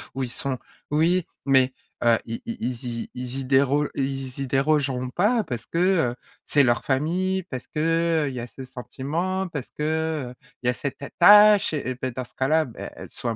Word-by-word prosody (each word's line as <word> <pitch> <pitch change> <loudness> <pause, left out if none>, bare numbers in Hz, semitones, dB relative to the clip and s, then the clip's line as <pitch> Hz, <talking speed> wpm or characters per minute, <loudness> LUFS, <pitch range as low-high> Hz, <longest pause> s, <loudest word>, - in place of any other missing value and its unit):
où 135 - -1
ils 125 - -3
sont 130 +2 -3 0.3
oui, 165 +4 +2 0.2
mais, 130 -1 +4 0.3
heu, 115 -1 +5
i 115 0 -5
i 230 0 -5
ils 125 0 -3
y 115 -1 -4
ils 125 +1 -4
y 135 - -3
déro 140 +2 +3
ils 135 -1 -3
y 135 - -2
dérogeront 135 -1 +1
pas 210 - +2
parce 120 -8 -5
que, - - -5 0.4
heu, - - -14 0.3
c'est 145 - +4
leur 120 -2 +2
famille, 180 +7 0
parce 130 -8 -7
que, 150 - -5 0.5
heu, - - -1
il - - -7
y 125 - -4
a 120 - -5
ce 130 - -10
sentiment, 155 +9 -3
parce 145 -6 -6
que, 155 -3 -2
heu, - - -11 0.3
il 125 - -1
y - - +5
a - - +2
cette 140 +2 -5
attache 205 +5 +7
et 130 -4 -2
beh, 130 -1 -1
dans 130 +2 -4
ce 120 - -16
cas-là, 155 +5 +2
beh 120 - -8 0.2
soit 115 -2 -3
135 Hz, 205 wpm, -24 LUFS, 125-160 Hz, 0.5 s, attache